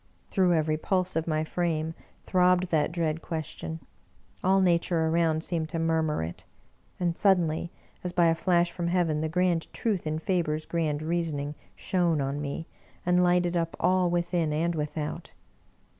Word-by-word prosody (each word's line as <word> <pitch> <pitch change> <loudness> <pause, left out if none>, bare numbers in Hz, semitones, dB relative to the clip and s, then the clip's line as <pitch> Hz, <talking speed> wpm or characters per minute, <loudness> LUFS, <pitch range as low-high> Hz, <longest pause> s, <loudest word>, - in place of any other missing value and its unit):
'' - - -38
Through 180 -3 +3
every 155 -1 +1
pulse 185 +2 0
of 160 0 -1
my 155 -1 +1
frame 160 -1 -1 0.3
throbbed 180 -1 +3
that 160 0 +2
dread 165 -2 -1
question; 160 0 -5 0.6
all 190 +1 +4
Nature 170 -2 +2
around 160 -1 +1
seemed 165 -3 -2
to 165 - -3
murmur 160 - +1
it. 80 +2 -7 0.6
And 175 -2 0
suddenly, 175 -5 +2 0.3
as 180 - -3
by 175 -1 +3
a 165 - +5
flash 175 +1 +2
from 170 0 -3
heaven, 170 -4 +1
the 160 - -1
grand 175 0 +1
truth 200 -8 -1
in 155 0 -1
Faber's 160 -2 -1
grand 155 -3 -1
reasoning 155 -3 -2 0.2
shone 175 -4 +1
on 140 +1 -2
me, 145 +3 -4 0.4
and 180 0 +3
Hghted 175 0 +3
up 165 -1 -1
all, 185 0 +3
within 170 -2 0
and 165 +3 0
without. 150 -1 -4
165 Hz, 160 wpm, -28 LUFS, 155-180 Hz, 0.6 s, a